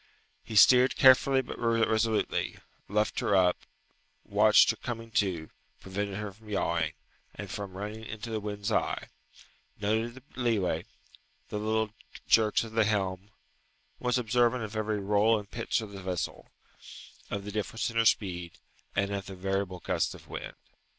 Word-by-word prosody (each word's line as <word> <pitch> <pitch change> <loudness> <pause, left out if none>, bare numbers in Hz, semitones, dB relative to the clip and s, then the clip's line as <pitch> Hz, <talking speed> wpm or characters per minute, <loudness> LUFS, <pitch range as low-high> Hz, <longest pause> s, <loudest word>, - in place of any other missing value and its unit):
He 110 - -7
steered 125 +4 +7
carefully 130 0 +6
but - - -8
resolutely, 115 -1 +1 0.3
luffed 105 +2 0
her 100 - +1
up, 90 -2 +4 0.6
watched 105 +2 +5
her - - -6
coming 115 -2 -6
to, 90 -7 0 0.3
prevented 100 +1 -4
her 105 -1 -4
from 105 +3 -17
yawing, 85 -5 0 0.4
and - - -7
from 100 -2 -5
running 105 +2 -6
into 110 +2 -6
the 110 - -1
wind's 105 +1 -4
eye: - - -1 0.7
noted 110 +3 0
the 130 - -13
leeway, 115 -7 0 0.6
the 105 - -3
little 110 0 0 0.3
jerks 110 -1 +4
of 115 - -8
the 110 -1 +3
helm: 95 -2 -1 0.7
was 125 0 +1
observant 120 0 +2
of 110 0 -6
every 110 -1 -1
roll 105 +3 +3
and 105 -1 -8
pitch 115 +1 -1
of 110 -2 -8
the 100 -1 -8
vessel, 90 -2 -4 0.8
of 100 -1 -4
the 105 - -5
difference 110 +3 -2
in 115 - -5
her 115 - +4
speed, 90 -6 +1 0.4
and 100 0 +1
of 100 -2 -4
the 95 - -7
variable 95 -1 -2
gusts - - -1
of - - -15
wind. - - -7
105 Hz, 155 wpm, -29 LUFS, 100-115 Hz, 0.8 s, steered